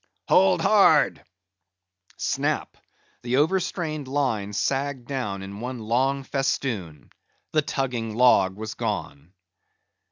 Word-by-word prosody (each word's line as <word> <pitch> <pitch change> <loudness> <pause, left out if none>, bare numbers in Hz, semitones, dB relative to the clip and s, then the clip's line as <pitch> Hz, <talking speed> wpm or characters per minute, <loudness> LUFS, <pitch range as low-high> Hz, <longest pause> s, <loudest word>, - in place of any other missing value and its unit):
"Hold 95 -1 +4
hard!" - - +4 0.9
Snap! - - -1 0.5
the 125 +1 -1
overstrained 155 -2 0
line 130 -8 -1
sagged 135 +3 -2
down 105 -8 -3
in 100 +1 -8
one 125 +2 -5
long 130 +5 0
festoon; 130 - -3 0.4
the 155 - +3
tugging 125 -6 -3
log 100 -6 +4
was 110 +1 -6
gone. 75 +6 -5
125 Hz, 100 wpm, -25 LUFS, 100-140 Hz, 0.9 s, Hold